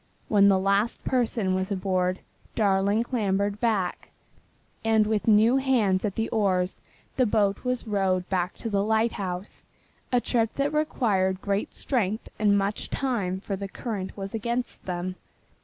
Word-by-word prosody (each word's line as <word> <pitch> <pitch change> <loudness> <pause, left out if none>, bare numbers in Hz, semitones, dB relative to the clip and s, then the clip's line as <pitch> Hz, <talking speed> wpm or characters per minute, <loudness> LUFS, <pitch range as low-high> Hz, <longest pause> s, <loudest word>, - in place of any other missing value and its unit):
When 200 -2 +5
the 195 -1 +5
last 200 +4 +1
person 230 -6 +1
was 190 +2 -1
aboard 185 -1 0 0.3
Darling 200 +1 +2
clambered 205 -4 -1
back, 210 -6 -1 0.7
and 220 -1 +3
with 215 0 -1
new 220 +4 +5
hands 235 -9 +2
at 205 -3 -2
the 225 0 -1
oars 190 -4 0 0.4
the 255 -2 +3
boat 205 -2 +1
was 250 -1 -1
rowed 190 -4 0
back 180 -1 -1
to 230 - -4
the 200 -1 +2
lighthouse 205 -4 -1 0.5
a 250 - +4
trip 230 -2 0
that 280 +2 -1
required 205 -11 +1
great 200 +1 -2
strength 220 -5 -1
and 205 -1 +4
much 200 +1 -2
time 200 -9 -1
for 200 - -3
the 200 +1 -5
current 200 -3 -5
was 195 0 -6
against 235 +2 -3
them. 180 0 -3
205 Hz, 150 wpm, -26 LUFS, 190-225 Hz, 0.7 s, When